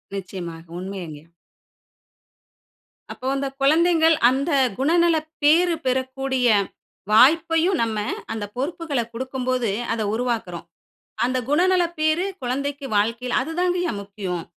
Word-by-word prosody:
நிச்சயமாக, 175 -4 -7
உண்மைங்க. 180 -6 -7 1.9
அப்போ 255 - -7
அந்த 275 0 -1
குழந்தைங்கள் 325 +2 +4
அந்த 275 +5 -1 0.3
குணநல 335 +4 +3 0.3
பேறு 335 +3 +4
பெறக்கூடிய, 260 0 0 0.6
வாய்ப்பையும் 325 - +4
நம்ம 220 -2 -2 0.4
அந்த 210 -2 -4
பொறுப்புகள 295 -1 -2
குடுக்கும்போது, 255 -2 -2 0.2
அத 230 - -2
உருவாக்குறோம். 220 -8 -3 0.6
அந்த 255 +1 0
குணநல 360 +4 +3 0.2
பேறு 315 +4 +2 0.2
குழந்தைக்கு 280 +3 -3
வாழ்க்கையில 230 +4 0
அது 315 +5 -5
தாங்கய்யா 360 -1 +1
முக்கியம். 195 -4 -5
260 Hz, 100 wpm, -22 LUFS, 220-325 Hz, 1.9 s, குழந்தைங்கள்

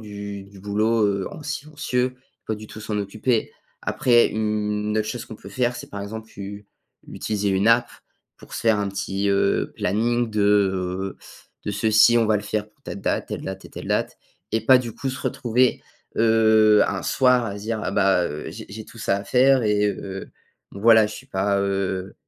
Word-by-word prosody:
du 100 -2 -7
du 100 -1 -15
boulot, 105 +2 +1
heu, 100 -1 -1
en - - -9
silencieux, 140 -4 -2 0.3
pas 110 - -1
du 110 0 -10
tout 110 - -10
s'en 105 -1 -2
occuper. 110 +4 -1 0.3
Après 120 -2 +3
une 105 0 -1
autre 110 - 0
chose 120 +1 -4
qu'on 110 - -10
peut - - -12
faire, 120 +3 0
c'est 120 - -8
par 100 0 -6
exemple, 110 +2 -7
tu 100 0 -9 0.4
utiliser 105 -2 -2
une 95 +2 +1
app 120 +1 +4 0.5
pour - - -16
se - - -4
faire 110 -2 +3
un 100 -1 -1
petit, 100 0 -2
heu, 100 0 +1
planning 120 +3 0
de, 105 -1 0
heu, 95 -2 +1 0.5
de 105 - -2
ceci, 110 +3 +5
on 115 - +2
va 110 -1 +3
le 105 - -4
faire 105 0 -3
pour 110 +6 -38
telle 100 - -7
date, - - -1
telle - - -4
date 95 0 -6
et - - -12
telle - - -8
date. - - -1 0.3
Et 110 - +2
pas 130 +4 +6
du 120 -2 -5
coup, 135 +4 -4
se 130 - -4
retrouver, 130 -2 +1 0.4
heu, 110 -1 +5
un - - -2
soir 125 -2 +3
à 100 - -5
se - - -10
dire: 110 0 -2
«Ah - - -2
bah, 90 -6 +1
j'ai - - -8
j'ai 110 +1 -7
tout - - -15
ça 100 - +1
à 100 - -5
faire 130 +2 +4
et 105 -1 +2
heu, 95 -1 -6 0.4
voilà, 110 +2 +5
je 105 - -7
suis 135 - -11
pas, 100 -4 0
heu, 95 -1 -2
105 Hz, 200 wpm, -23 LUFS, 100-115 Hz, 0.5 s, pas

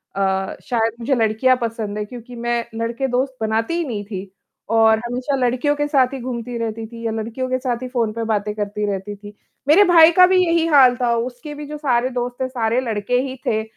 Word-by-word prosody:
अ, 190 -1 -1
शायद 225 -2 0
मुझे 260 +3 0
लड़कियाँ 225 +3 +2
पसंद 225 -3 -3
हैं 210 - -3
क्योंकि 245 0 -10
मैं 235 0 -1
लड़के 230 +3 -2
दोस्त 260 +1 -1
बनाती 220 +6 0
ही 345 - 0
नहीं 210 -5 -4
थी 195 -2 -7 0.4
और 220 -1 +5
हमेशा 250 +3 -2
लड़कियों 255 +3 +1
के 295 0 -1
साथ 270 -3 +2
ही 270 - -4
घूमती 240 -1 -5
रहती 225 -1 -4
थी 230 0 -9
या 225 - 0
लड़कियों 230 +4 -4
के 255 - +1
साथ 250 -2 -2
ही - - -4
फ़ोन 235 -4 -1
पे 230 +1 -3
बातें 210 -1 -1
करती 210 0 -3
रहती 200 +1 -5
थी, 205 0 -12 0.3
मेरे 325 +8 +7
भाई 335 -2 +7
का 365 +2 +7
भी 375 0 +3
यही 335 -1 +2
हाल 270 -5 +6
था 240 -1 +2
उसके 245 +6 -5
भी 295 0 -7
जो 300 +1 -6
सारे 255 -4 +1
दोस्त 245 -1 -3
थे 260 - 0
सारे 235 -1 0
लड़के 230 0 -1
ही 260 0 -5
थे 220 0 0
240 Hz, 220 wpm, -20 LUFS, 220-260 Hz, 0.4 s, मेरे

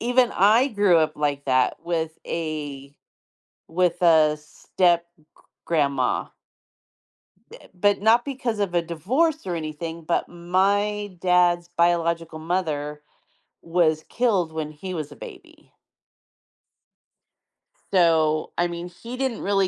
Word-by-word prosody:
even 245 +1 +2
I 220 +8 +4
grew 205 -7 +3
up 155 -1 +1
like 145 -1 -1
that 130 -2 +2
with 160 -2 -2
a 145 -4 -5 0.7
with 180 +1 0
a 155 -3 +5
step-g 170 +2 -1 0.4
grandma. 140 -5 0 1.2
Uh - - -13
but 205 +2 +2
not 230 +2 +5
because 250 -5 -3
of 195 -4 -1
a 170 - +2
divorce 250 - -1
or 175 - -2
anything, 160 +1 -6
but 170 +2 -1
my 200 +3 0
dad's 175 -1 +2
biological 170 -1 0
mother 155 -3 -3 0.6
was 165 -2 +1
killed 200 -10 0
when 155 -1 -4
he 180 +5 -7
was 155 -3 -5
a 145 - -12
baby. - - -13 2.2
So, 160 -4 +2
I 175 - +3
mean 175 +1 -6
he 230 +8 -9
didn't 260 -3 -2
really 195 -1 +1
170 Hz, 120 wpm, -24 LUFS, 155-195 Hz, 2.2 s, a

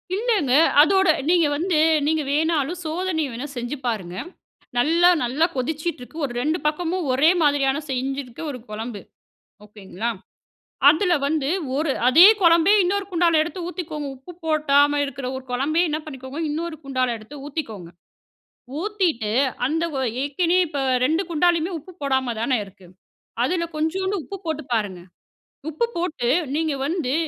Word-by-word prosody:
இல்லங்க, 410 - +1 0.3
அதோட 380 +3 +4 0.2
நீங்க 340 -3 +4
வந்து 335 +1 0 0.3
நீங்க 315 +1 +1
வேணாலும் 315 +2 0
சோதனை 330 0 -1
வேணா 245 +5 -5
செஞ்சு 240 +4 -3
பாருங்க. 190 -7 -3 0.6
நல்லா 335 +7 +4
நல்லா 270 +7 +1
கொதிச்சிட்டுருக்கு. 305 +1 -4
ஒரு 250 - -6
2 310 +5 0
பக்கமும் 340 +3 -1
ஒரே 275 +5 +4
மாதிரியான 285 -2 +2
செஞ்சிருக்கு 265 0 -4
ஒரு 255 - -8
குழம்பு. 215 0 -6 0.6
ஓகேங்களா? 210 +2 -5 0.8
அதில 345 +4 +3
வந்து 300 -2 -1 0.3
ஒரு 305 -1 0 0.2
அதே 315 +8 +8 0.2
குழம்பே 340 +2 +5
இன்னொரு 400 +3 0
குண்டால 340 -2 +3
எடுத்து 340 +2 -6
ஊத்திக்கோங்க. 310 -5 -5
உப்பு 265 +7 -13
போடாம 290 -2 +3
இருக்குற 275 -2 -6
ஒரு 260 - -9
குழம்பு 280 +6 0
என்ன 305 - -1
பண்ணிக்கோங்க 265 0 -8
இன்னொரு 325 +2 -3
குண்டால 255 -3 -1
எடுத்து 220 +7 -12
ஊத்திக்கோங்க. 225 - -6 0.9
ஊத்திட்டு 360 - -1 0.4
அந்த 320 +4 -1
ஒ - - -1 0.2
ஏற்கனவே 335 +6 +1
இப்ப 290 -2 -4 0.3
2 320 +6 +1
குண்டாலையுமே 340 +1 +2
உப்பு 365 +5 -14
போடாம 265 -4 0
தானே 255 +2 +1
இருக்கு. 190 -2 -17 0.6
அதில 350 -2 0
கொஞ்சோண்டு 375 +6 -1
உப்பு 395 - -7
போட்டு 315 -2 -3
பாருங்க. 205 -5 -1 0.7
உப்பு 395 +10 0
போட்டு 330 -8 -2 0.3
நீங்க 315 -1 0
வந்து 300 -5 -1
300 Hz, 135 wpm, -22 LUFS, 260-335 Hz, 0.9 s, அதே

